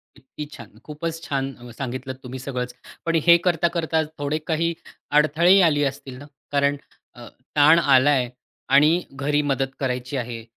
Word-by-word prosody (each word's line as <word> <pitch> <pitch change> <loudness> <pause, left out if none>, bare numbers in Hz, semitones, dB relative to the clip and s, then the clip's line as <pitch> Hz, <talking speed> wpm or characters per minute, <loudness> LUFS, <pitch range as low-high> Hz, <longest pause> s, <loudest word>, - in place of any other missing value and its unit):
किती 140 +2 -9
छान. - - -13
खूपच 165 +2 -5
छान 135 -4 -4
सांगितलत 130 0 -5
तुम्ही 130 +1 -7
सगळंच. 125 -2 -4 0.3
पण 165 0 0
हे 170 0 +9
करता, 170 -1 +2
करता 160 -2 0
थोडे 145 +1 -1
काही 165 +1 0 0.5
अडथळेही 170 +6 +4
आले 150 -4 +3
असतील 135 -2 -4
ना? 140 - -11 0.3
कारण 140 0 +2 0.4
अ, 120 -1 -11 0.3
ताण 155 +3 +6
आलाय 135 -3 +3 0.5
आणि 155 +5 +5
घरी 145 +2 0
मदत 135 0 -1
करायची 125 0 -3
आहे 120 -2 -5
140 Hz, 150 wpm, -23 LUFS, 130-160 Hz, 0.5 s, हे